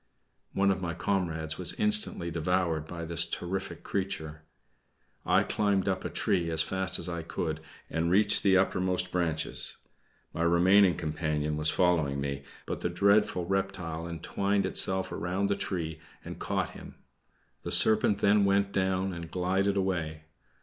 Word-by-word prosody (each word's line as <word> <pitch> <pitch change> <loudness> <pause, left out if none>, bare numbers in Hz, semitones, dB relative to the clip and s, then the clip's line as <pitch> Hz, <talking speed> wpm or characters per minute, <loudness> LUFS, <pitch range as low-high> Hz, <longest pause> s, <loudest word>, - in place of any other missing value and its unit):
One 100 0 +2
of 95 - -2
my 85 -2 -3
comrades 85 -4 -2
was 90 - -1
instantly 210 - +4
devoured 85 -1 -1
by 85 0 -6
this 85 0 +2
terrific 95 +2 -5
creature. 80 -5 -4 0.9
I - - +4
climbed 100 -2 0
up 95 -1 -1
a - - -3
tree 85 -4 0
as 80 0 +2
fast 95 +2 -1
as 85 - -4
I 85 -1 -4
could, 80 -1 -4 0.3
and 85 +1 -1
reached 105 +3 +3
the 95 -2 +3
topmost 90 -1 0
branches; 80 -3 -1 0.6
my 80 - -4
remaining 90 +3 +4
companion 75 -2 -2
was 75 +1 0
following 80 -7 +1
me, 70 0 -3 0.2
but - - -5
the - - -1
dreadful 100 0 +2
reptile 90 -4 -3
entwined 100 +4 -1
itself 95 0 0
round 95 +3 -2
the - - +2
tree 80 -5 -4 0.3
and - - -8
caught - - -2
him. - - -12 0.7
The - - -6
serpent 110 -2 +5
then 100 0 +4
went 100 0 +2
down 95 -1 -1
and 85 -1 -7
glided 95 +2 0
away. 85 -5 -2
90 Hz, 150 wpm, -28 LUFS, 80-95 Hz, 0.9 s, serpent